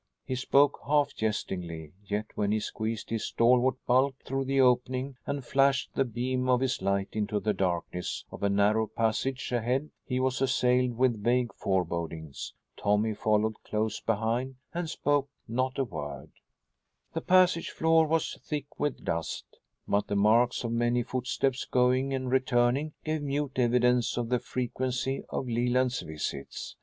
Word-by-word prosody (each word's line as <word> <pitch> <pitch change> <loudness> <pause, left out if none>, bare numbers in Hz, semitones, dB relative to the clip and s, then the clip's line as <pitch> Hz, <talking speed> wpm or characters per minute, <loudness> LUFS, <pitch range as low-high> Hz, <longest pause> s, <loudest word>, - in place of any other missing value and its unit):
He - - -3
spoke 140 +3 +3
half 145 0 +3
jestingly, 85 -7 -3
yet 105 +1 -2
when 100 -1 0
he 110 - +2
squeezed 110 +1 -4
his 115 -1 -1
stalwart 125 +2 +3
bulk 130 +2 +3
through 135 0 -2
the 135 +1 +1
opening 130 +1 +2
and 140 -2 -3
flashed 135 -1 +2
the 135 - +2
beam 125 +2 -2
of 125 -1 +4
his 130 -4 -1
light 100 0 0
into 105 -1 -1
the 105 +1 0
darkness 90 -1 -2
of - - -9
a 100 - +2
narrow 105 +2 +3
passage 115 +5 -1
ahead 125 +5 0
he 125 0 -2
was 130 0 0
assailed 125 -1 +2
with 120 -4 +2
vague 120 0 +2
forebodings. 85 -6 -3 0.2
Tommy 105 +2 +1
followed 110 +1 0
close 110 0 -1
behind 115 +4 -1 0.2
and 170 -1 -2
spoke 145 -2 0 0.2
not 130 +3 -1
a 135 - +2
word. 75 - -6 0.8
The - - -2
passage 180 -2 +4
floor 160 0 +3
was 160 0 0
thick 145 -2 -5
with 145 -2 -2
dust, 85 0 -2 0.4
but 100 +1 +1
the 100 - -1
marks 115 +5 +3
of 115 - -2
many 120 +1 +1
footsteps 130 +1 -1
going 130 +2 +2
and 130 -1 -2
returning 130 +3 +2
gave 155 -1 -1
mute 140 -1 -2
evidence 125 0 +3
of 120 -1 -1
the 125 -1 +2
frequency 130 +2 -2
of 130 - -3
Leland's 125 +2 +1
visits. 75 -3 -5
125 Hz, 155 wpm, -29 LUFS, 110-130 Hz, 0.8 s, of